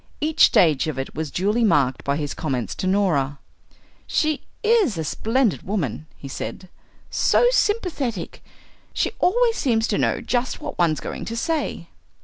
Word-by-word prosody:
Each 310 +1 +5
stage 155 -4 +3
of 155 - -3
it 135 - -4
was 155 0 -3
duly 210 +8 0
marked 140 - +2
by 140 0 0
his 145 -2 -3
comments 125 - -3
to 185 - -3
Norah. 165 -8 +1 0.7
"She 310 -1 0 0.2
is 425 - +3
a 160 - -2
splendid 225 - 0
woman," 155 - -3
he 140 - -9
said, 180 +6 -6 0.4
"so - - +3
sympathetic. 335 - -1 0.5
She - - 0
always 465 +4 +3
seems 230 -4 +1
to - - 0
know - - +1
just 250 0 -1
what - - -7
one's 160 -4 +2
going - - -5
to 230 - -5
say." 320 +5 -2
200 Hz, 155 wpm, -23 LUFS, -, 0.7 s, Each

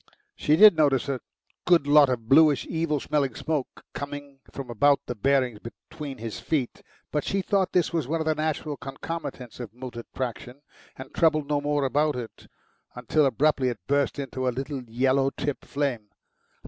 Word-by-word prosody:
She 150 - +2
did 210 +2 +8
notice 145 -5 +2
a 135 -2 -1 0.5
good 175 -5 +5
lot 145 -1 +6
of 115 -3 -3
bluish, 145 0 +5
evil 160 -3 -1
smelling 140 -3 -1
smoke 155 -5 -3
coming 145 -1 -7
from 135 -3 -7
about 140 +5 +3
the - - -4
bearings 125 -1 +1
between 135 +5 -9
his 115 -1 -6
feet, 140 -6 -2 0.3
but 150 - -1
she 195 -1 -1
thought 195 -1 +1
this 175 -1 +2
was 160 -6 -1
one 165 +3 -1
of 160 - -2
the 155 - +2
natural 155 -1 -2
concomitants 135 -3 -7
of 120 -2 -8
motor 125 -2 -7
traction, 125 +2 -5 0.3
and 130 0 -10
troubled 155 -3 +2
no 145 -1 0
more 145 -1 0
about 150 +3 +1
it, 120 -3 -8 0.5
until 135 +4 +2
abruptly 135 0 +2
it 120 - -4
burst 140 +1 +1
into 130 -2 -3
a - - +4
little 135 +2 -4
yellow 130 +4 +1
tipped 140 0 -4
flame. 130 -7 -2
140 Hz, 175 wpm, -26 LUFS, 130-150 Hz, 0.5 s, did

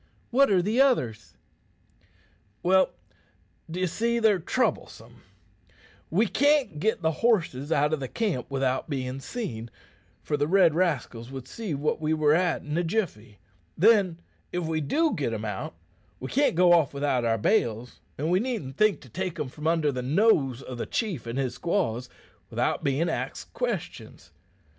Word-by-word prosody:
"What 275 +3 +5
are 185 -3 +3
the 220 +7 +2
others?" 120 - +1 1.3
"Well, 190 +1 +4 0.8
d'ye 180 +3 -1
see, 235 +6 0
they're 220 -4 +3
troublesome. 160 - -2 0.9
We 200 +8 +3
can't 285 - +2
git 215 0 0
the 160 - +3
horses 165 - +1
out 150 0 +2
o' 140 -4 -2
camp 195 - -2
without 135 +1 -1
bein' 130 -2 -3
seen, 120 - -5 0.5
for 150 - -1
the 145 0 0
red 175 -2 +5
rascals 140 -9 -1
would 130 -1 -8
see 210 -5 -4
what 150 +3 -1
we 155 0 +1
were 150 -1 +3
at 175 +1 +1
in 150 0 -4
a - - +1
jiffy. 160 - -3 0.4
Then, 195 -3 +4 0.3
if 175 -1 -2
we 160 0 -1
do 310 - +1
git 135 -6 -2
'em 110 0 -4
out, 105 -5 -5 0.4
we 130 - -6
can't 285 - +2
go 175 0 +6
off 155 -5 +3
without 140 -3 0
our 115 -1 +1
bales, 120 - 0 0.2
an' 155 +4 -1
we 180 - +4
needn't 210 - -4
think 215 -1 +3
to 130 - -15
take 185 +3 -4
'em 145 -3 -2
from 150 +4 -5
under 160 -3 +2
the 130 -2 -3
nose 135 - +2
o' 130 - -6
the 120 - -5
chief 185 - -2
and 115 +2 -4
his 130 -3 -1
squaws 125 - -1 0.4
without - - -1
bein' 140 +5 +1
axed - - -4
questions. - - -5
155 Hz, 165 wpm, -27 LUFS, 130-195 Hz, 1.3 s, go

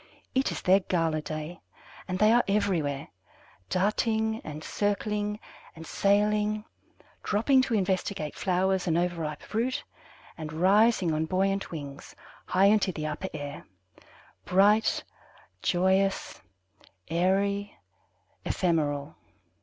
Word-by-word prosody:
It 265 +1 +1
is - - -5
their 190 +1 +5
gala 165 -4 0
day, 155 +3 -6 0.5
and 185 -1 -2
they 215 +3 +5
are 240 - +5
everywhere, 180 -9 0 0.6
darting 220 +3 +1
and 155 +1 -7
circling 210 0 -1 0.4
and 165 0 -10
sailing, 210 +3 +1 0.6
dropping 260 +6 +3
to 255 -3 0
investigate 190 -4 -1
flowers 190 0 0
and 165 -1 +2
overripe 170 -4 -2
fruit, 235 +4 -2 0.6
and 155 -1 -5
rising 190 +2 +3
on 155 +1 -1
buoyant 195 +2 0
wings 140 -4 -8 0.3
high 190 +1 +3
into 200 -1 +4
the 155 -3 -5
upper 155 +5 -4
air, 145 -1 -6 0.8
bright, 205 +4 +3 0.6
joyous, 190 +2 +1 0.7
airy, 200 +4 0 0.7
ephemeral. 150 -4 -1
190 Hz, 105 wpm, -28 LUFS, 160-210 Hz, 0.8 s, their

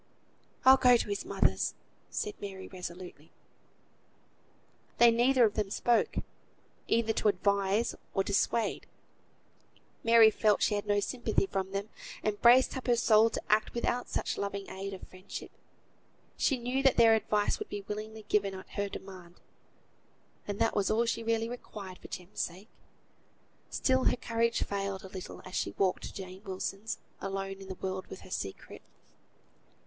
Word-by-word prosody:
"I'll 265 +1 +9
go 250 -2 +6
to 220 - -3
his 200 0 -3
mother's," - - +1 0.3
said 425 -2 -3
Mary, 190 -2 -7
resolutely. 180 -3 -9 1.7
They 235 0 +7
neither 245 +2 +4
of 210 - +1
them 210 -2 -1
spoke, 235 +3 +1 0.7
either 225 -1 +2
to 215 - 0
advise 200 +2 +2 0.2
or 195 - +3
dissuade. 205 +3 0 1.2
Mary 230 -1 +7
felt 210 -1 +2
she - - +2
had 205 0 -2
no 205 0 +2
sympathy 235 -2 0
from 195 0 -3
them, 200 +2 -3 0.3
and 210 -1 -1
braced 250 +3 +6
up 260 - -5
her 240 - +4
soul 225 -1 +5
to - - -4
act 215 +2 +2
without 240 +1 -1
such - - -2
loving 200 -1 -3
aid 195 +1 -5
of 185 - -11
friendship. 185 +1 -9 0.8
She 270 - +1
knew 250 +2 -1
that 270 -1 +4
their 230 -1 +7
advice 210 -1 +1
would - - -6
be 200 -1 -6
willingly 215 +1 -6
given 200 -2 +1
at 190 - -10
her 200 0 -2
demand, 185 -3 -10 1.1
and 205 -1 -3
that 225 - +1
was 200 -2 +1
all 230 +2 +2
she 230 0 -1
really 225 0 0
required 205 -6 -8
for - - -11
Jem's 180 +1 -6
sake. 185 +5 -5 1.0
Still 260 -1 +1
her - - +3
courage 230 0 0
failed 195 -1 -3
a 190 - -9
little 185 -1 -8
as 185 - -10
she - - -2
walked 190 -2 +1
to - - -7
Jane 190 -1 -8
Wilson's, 195 +2 -4 0.2
alone 195 0 -4
in 195 - -10
the 190 - -6
world 190 0 -3
with 190 - -9
her 185 - -14
secret. 95 - -6
205 Hz, 160 wpm, -31 LUFS, 195-230 Hz, 1.7 s, I'll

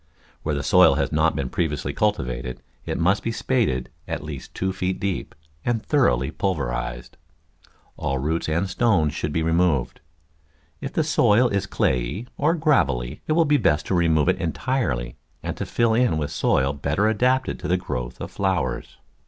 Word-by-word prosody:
Where 75 -1 -1
the 70 - -2
soil - - +6
has - - 0
not 80 +1 +2
been 65 -2 -2
previously 75 -5 -1
cultivated 65 -11 -1 0.3
it - - -2
must 95 +4 +2
be 115 - -2
spaded 110 - 0 0.2
at - - -4
least 75 -4 -8
two 95 0 -1
feet 95 0 -2
deep, 100 -2 -3 0.3
and 120 -2 -1
thoroughly 65 - +2
pulverised. - - -3 0.8
All 70 0 -1
roots 80 +5 -1
and 85 +5 0
stones 95 -7 +2
should 75 - -3
be 80 +2 0
removed. 80 -5 +1 0.8
If - - -5
the - - +2
soil 120 +4 +4
is 100 0 -1
clayey 65 - -1
or 155 +4 +2
gravelly 75 - +1
it 155 - +2
will 165 +1 +4
be 145 0 +4
best 75 - +2
to - - +1
remove 80 -3 +3
it 95 +1 +1
entirely 80 - -1 0.3
and - - -3
to - - -4
fill 115 -1 +2
in 120 -7 +2
with 75 -2 -2
soil 70 +2 +1
better 70 +8 0
adapted 125 +4 +1
to - - -5
the 90 - +2
growth 60 -7 -5
of - - -6
flowers. 95 -10 -2
80 Hz, 170 wpm, -23 LUFS, 70-105 Hz, 0.8 s, soil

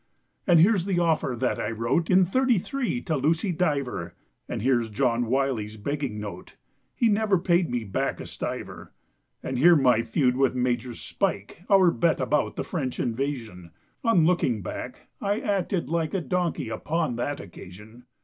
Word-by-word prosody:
And 175 -3 +6
here's 185 +1 +4
the 195 -3 0
offer 160 -7 +1
that 130 - 0
I - - -2
wrote 115 +9 0
In 185 0 +5
'33 250 +3 0
to 160 - -1
Lucy 160 +7 +1
Diver; 150 -7 -2 0.3
And - - -3
here 125 -2 +3
John 115 +1 0
Wylie's 120 -4 -1
begging 135 -1 -3
note— 100 -4 -8 0.4
He 235 - +2
never 210 -2 +2
paid 175 0 +2
me 120 -1 -2
back 100 - -2
a - - -6
stiver. - - -6 0.5
And 130 -1 -3
here 170 +5 +7
my 125 -6 +4
feud 125 +2 +1
with 135 -1 +2
Major 125 -1 -1
Spike, 105 - -3
Our 190 -4 +6
bet 170 -1 +1
about 150 - 0
the - - -3
French 135 -8 -4
Invasion; 115 -8 -3 0.3
On 225 -9 +4
looking 130 - +1
back - - -6 0.2
I 205 +2 0
acted 195 - -1
like 165 +2 -1
A 190 - 0
donkey 170 -4 -1
upon 125 +3 -2
that 145 +4 -2
occasion. 105 +6 -12
140 Hz, 160 wpm, -26 LUFS, 120-175 Hz, 0.5 s, here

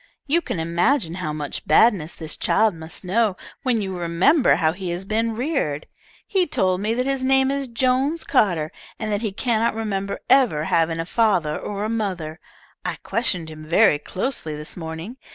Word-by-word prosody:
You 320 +4 +2
can 185 - -4
imagine 170 - +1
how 155 - -2
much 150 -1 -5
badness 170 -1 +4
this 160 -2 -4
child 220 -2 +2
must 160 +2 -7
know 200 +1 +1 0.2
when 245 -6 +1
you 190 -1 -4
remember 180 - +3
how 160 -2 +2
he 180 +1 -5
has 175 +2 -3
been 225 +2 0
reared. 235 - -1 0.4
He 380 -3 +1
told 185 -7 +1
me 220 +2 0
that 250 +1 0
his 270 -1 0
name 265 0 +3
is 275 -1 -2
Jones 260 +6 +1
Carter, 175 - +1 0.3
and 215 -1 -3
that 205 0 0
he 220 -3 -1
cannot 230 +2 0
remember 200 -3 -3
ever 240 - +4
having 165 0 +1
a 165 - -2
father 180 -7 +1
or 205 0 -4
a - - 0
mother. 185 -8 -3 0.4
I - - -2
questioned 180 -9 +1
him 155 0 -10
very 165 0 +4
closely 185 - -3
this 150 +1 -7
morning. 165 +7 -7
200 Hz, 180 wpm, -22 LUFS, 165-240 Hz, 0.4 s, badness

